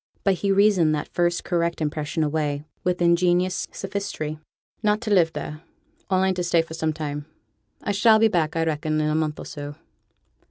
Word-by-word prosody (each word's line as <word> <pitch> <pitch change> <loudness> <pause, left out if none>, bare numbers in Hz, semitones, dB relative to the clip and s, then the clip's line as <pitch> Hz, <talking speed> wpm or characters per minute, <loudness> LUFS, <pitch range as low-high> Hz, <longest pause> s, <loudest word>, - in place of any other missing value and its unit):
But 195 - +4
he 200 - +2
reasoned 195 -6 +4
that 150 - -5
first 175 0 +1
correct 170 -1 0
impression 155 0 -1
away 150 -1 -1 0.2
with 180 -1 0
ingenious 175 +1 +2
sophistry. 195 -6 -4 0.4
'Not 210 -1 +2
to 215 -3 0
live 170 -4 +4
there: 150 +1 -6 0.5
only 190 0 +2
to 180 -1 -2
stay 170 -1 +3
for 165 - -10
some 160 -1 -1
time. 150 -1 -5 0.6
I - - 0
shall 220 +2 +5
be 225 +1 +5
back, 165 -7 0
I 165 - +1
reckon, 155 -1 -1
in 155 0 +1
a - - +1
month 155 -1 0
or - - -8
so.' 145 -1 -7
170 Hz, 185 wpm, -24 LUFS, 155-190 Hz, 0.6 s, shall